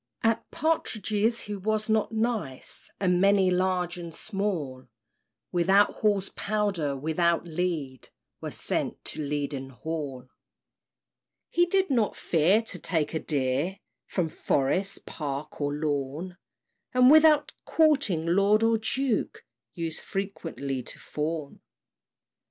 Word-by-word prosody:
At 225 0 +1
partridges 225 - 0
he 210 - -5
was 215 +2 -1
not 220 -1 +1
nice; 220 - -2
And 180 -2 +2
many, 195 -1 +4
large 180 -1 0
and 170 -2 -8
small, 175 - -3 0.6
Without 190 +4 +4
Hall's 205 -3 +1
powder, 195 -9 -1
without 165 +4 +1
lead, 160 -6 -3 0.3
Were - - -4
sent - - -2
to - - -3
Leaden 140 -2 -3
Hall. 135 -2 -5 1.2
He 350 0 +3
did 380 -2 +2
not 230 -5 +2
fear 180 +7 +3
to 225 - -4
take 160 -4 -1
a 160 - 0
deer 145 +6 -1 0.3
From 180 -4 0
forest, 160 +6 0
park, 150 0 -5
or 145 0 0
lawn; 150 +3 -2 0.6
And 250 +1 +7
without 305 -1 +6
courting 280 - +3
lord 200 +5 +3
or 225 0 +3
duke, 250 +1 -1 0.3
Used 165 -2 -2
frequently 165 -9 -4
to - - -8
fawn. 150 -1 -4
180 Hz, 115 wpm, -27 LUFS, 150-215 Hz, 1.2 s, And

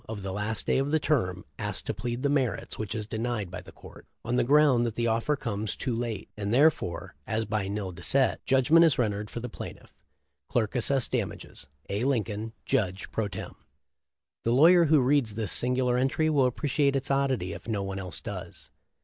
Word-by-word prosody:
of 105 -3 -5
the 95 - -3
last 105 +2 -2
day - - +2
of 135 +1 0
the 155 +1 +2
term, 105 -12 0
ask 105 0 -2
to - - -2
plead 120 +4 -3
to 125 - -7
the 140 - +2
merits, 125 -5 -1
which 110 -1 -3
is 110 -1 -3
denied 110 -3 -3
by 90 -1 -6
the - - -14
court - - -14 0.2
on 120 +2 0
the - - +3
ground 140 -2 +5
that 115 -2 -2
the 120 - 0
offer 115 +6 +1
comes 110 -5 -3
too 125 -4 -2
late, 115 -4 -3
and 100 -1 -3
there 145 +7 +6
fore, 85 - -6
as 110 0 -1
by 105 -2 -1
nil 100 -2 -3
dicet, 130 +10 +1
judgment 135 +5 +5
is 160 -5 +4
rendered 105 -3 -1
for - - -5
Pl'ff. 125 -1 -8 0.6
Clerk 115 0 0
assess 130 +2 +2
damages. 70 - -4 0.2
A. 100 +4 -2
Lincoln, 110 -4 -1
Judge 95 -1 -1
pro 110 -2 -1
tern/ 95 -2 -7 0.5
>: 70 +1 -64
The 115 - +2
lawyer 170 +6 +7
who 155 -2 +5
reads 125 -4 +2
this 110 -6 -1
singular 125 0 +1
entry 155 +4 +1
will 135 -4 +4
appreciate 140 +2 +1
its 135 0 -1
oddity 135 -10 0
if - - -10
no 105 -3 -1
one 95 0 -4
else 90 -2 -5
does. - - -8
115 Hz, 205 wpm, -28 LUFS, 105-135 Hz, 0.6 s, lawyer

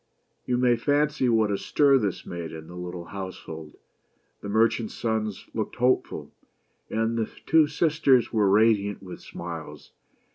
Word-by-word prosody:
You 125 - +1
may 125 -1 +3
fancy 145 0 +1
what 110 -2 +3
a 100 - -1
stir 140 -2 +4
this 100 -5 -2
made 85 -2 -6
in 80 -1 -8
the 90 - -11
little 90 -1 -6
house 95 -1 -6
hold. 80 -2 -9 0.7
The 100 - -6
merchant's 110 +1 +1
sons 110 -3 -2
looked 110 -2 -3
hopeful, 125 +1 0 0.6
and 115 +1 0
the 110 - -1 0.2
two 160 -1 +5
sisters 145 -5 +2
were 105 -3 +3
radiant 105 -1 +3
with 90 -2 -9
smiles. 80 -3 -8
110 Hz, 150 wpm, -26 LUFS, 90-125 Hz, 0.7 s, two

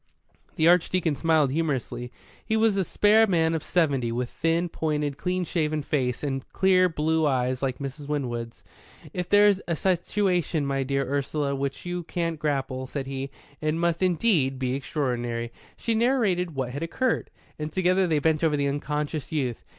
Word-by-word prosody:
The 160 - +3
Archdeacon 175 -2 +3
smiled 155 -2 +2
humorously. 135 -5 -2 0.3
He 220 0 0
was 220 -2 +3
a 195 - +2
spare 215 +4 +4
man 165 -4 +2
of 160 - -2
seventy, 140 -9 +1
with 120 +1 -2
thin, 165 +2 0
pointed, 150 -3 -2
clean 180 +4 -1
shaven 155 -3 -1
face, 130 -4 -1
and 135 -2 -2
clear 185 -1 +4
blue 160 0 +1
eyes 130 -2 0
like 130 -2 -2
Miss 140 +1 -5
Winwood's. 125 -6 -4 0.5
"If 180 -1 -3
there's 205 -1 +5
a 170 - 0
situation, 180 -3 0
my 135 0 0
dear 135 +1 -1
Ursula, 140 +1 -1
with 135 - -4
which 140 +3 -3
you 175 0 -3
can't 165 -1 -3
grapple," 135 -3 -2
said 135 0 -4
he, 135 0 -4 0.3
"it 155 0 0
must 170 +1 0
indeed 175 - +2
be 130 -1 -1
extraordinary." 120 -4 -2 0.3
She 230 - -1
narrated 220 - +1
what 130 -2 -2
had 140 +4 -5
occurred, 230 +9 -1 0.3
and 150 0 -4
together 185 +1 +2
they 160 -3 +2
bent 155 +1 +1
over 155 -2 +3
the 140 - 0
unconscious 150 0 -3
youth. 130 -7 -2
155 Hz, 170 wpm, -26 LUFS, 135-175 Hz, 0.5 s, there's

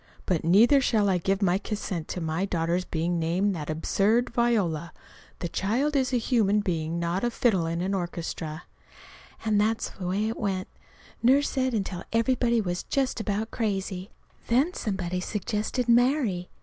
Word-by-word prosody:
But 180 -4 0
neither 225 - +6
shall 215 -5 +2
I 185 -2 +2
give 195 +3 0
my 185 0 +3
consent 195 -6 -4
to 180 - -4
my 160 +3 -1
daughter's 175 -1 0
being 170 +1 -1
named 180 +5 +1
that 155 -4 -5
absurd 205 +9 +1
Viola. 200 -10 +1 0.5
The 175 - -1
child 240 - 0
is 265 -2 +2
a 250 - +2
human 220 -4 +2
being 165 -4 -2
not 170 +4 -1
a 240 - +2
fiddle 210 -8 +1
in 170 +1 -2
an 190 +2 -1
orchestra!" 170 -3 -4 0.8
And 210 -2 +3
that's 220 +1 0
the 180 - -6
way 200 +4 0
it 225 - -3
went, 195 -3 -2 0.5
Nurse 270 +4 +4
said, 260 -3 0
until 190 -4 -3
everybody 235 0 +2
was 180 -4 -2
just 270 -3 -1
about 215 +1 -2
crazy. 195 -3 -2 0.4
Then 270 +9 +2
somebody 185 - -2
suggested 215 +5 -2
"Mary." 240 -6 +2
200 Hz, 160 wpm, -27 LUFS, 175-235 Hz, 0.8 s, neither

